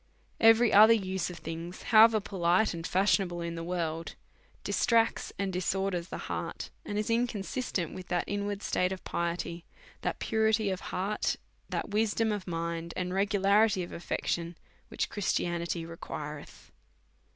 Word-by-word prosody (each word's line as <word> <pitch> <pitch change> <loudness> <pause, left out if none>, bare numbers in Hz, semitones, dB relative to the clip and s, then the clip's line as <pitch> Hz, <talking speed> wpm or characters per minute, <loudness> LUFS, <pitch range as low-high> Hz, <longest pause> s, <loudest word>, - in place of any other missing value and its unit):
Every 225 +1 +6
other 220 +3 +9
use 190 -4 -2
of 175 - -8
things 165 +2 -7
(however 220 -1 +7
polite 185 +1 +1
and 165 0 -4
fashionable 185 -2 +1
iu 170 - -3
the 165 0 -5
world) 165 -2 -3 0.5
distracts 230 -1 +2
and 195 -1 -2
disorders 185 -1 -1
the - - -6
heart, - - -5
and 205 -10 -4
is 210 +2 -1
in 235 +2 +3
consistent 200 - -3
with 185 -1 -8
that 175 -1 0
inward 205 0 -3
state 180 0 +1
of 190 - -5
piety, 170 0 -3 0.4
that - - -2
purity 220 -2 +1
of 185 - -2
heart, 200 +3 -1 0.3
that - - -3
wisdom 220 +1 +1
of 205 -3 -3
mind, 170 0 -3
and 180 0 -2
regularity 200 0 +3
of 175 - -8
affection, 170 0 -3 0.3
which - - -2
Christianity 170 -4 -1
requireth. 150 -3 -8
185 Hz, 145 wpm, -30 LUFS, 170-210 Hz, 0.5 s, other